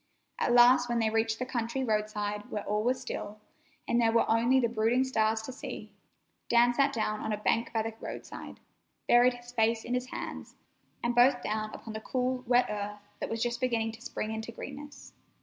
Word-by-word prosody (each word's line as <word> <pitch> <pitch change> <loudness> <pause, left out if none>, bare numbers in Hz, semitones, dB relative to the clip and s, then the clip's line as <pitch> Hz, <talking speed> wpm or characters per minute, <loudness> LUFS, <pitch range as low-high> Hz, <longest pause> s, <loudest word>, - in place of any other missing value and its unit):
At - - +1
last, 245 0 +6
when 240 - +1
they 225 -1 +1
reached 225 0 +1
the 255 - -3
country 250 +1 -2
roadside 210 -2 -2
where 210 - -3
all 210 +1 0
was 250 +2 +1
still, 215 -4 -6 0.5
and 235 0 +2
there 225 -1 +4
were 230 - +3
only 235 +4 +4
the 240 - +2
brooding 230 +3 +2
stars 220 -4 +1
to 260 - -6
see, 255 - -8 0.6
Dan 240 +1 +5
sat 275 +2 +3
down 215 -4 -1
on - - -3
a 210 - 0
bank 225 +2 0
by 225 -1 0
the 225 0 -4
roadside, - - -8 0.5
buried 245 +1 +5
his 245 0 -12
face 225 -1 +1
in 245 - -3
his 250 0 -1
hands, - - -7 0.5
and 235 0 +1
both 245 +1 +4
down 215 0 -2
upon 220 - -8
the 220 - -5
cool, 255 +1 -1
wet 245 +1 +4
earth 205 0 -4 0.2
that - - -3
was 225 0 -1
just 240 0 -2
beginning 230 -3 0
to 225 +1 -13
spring 220 -3 -4
into 220 +1 -5
greenness. 285 +4 -9
235 Hz, 200 wpm, -30 LUFS, 220-250 Hz, 0.6 s, last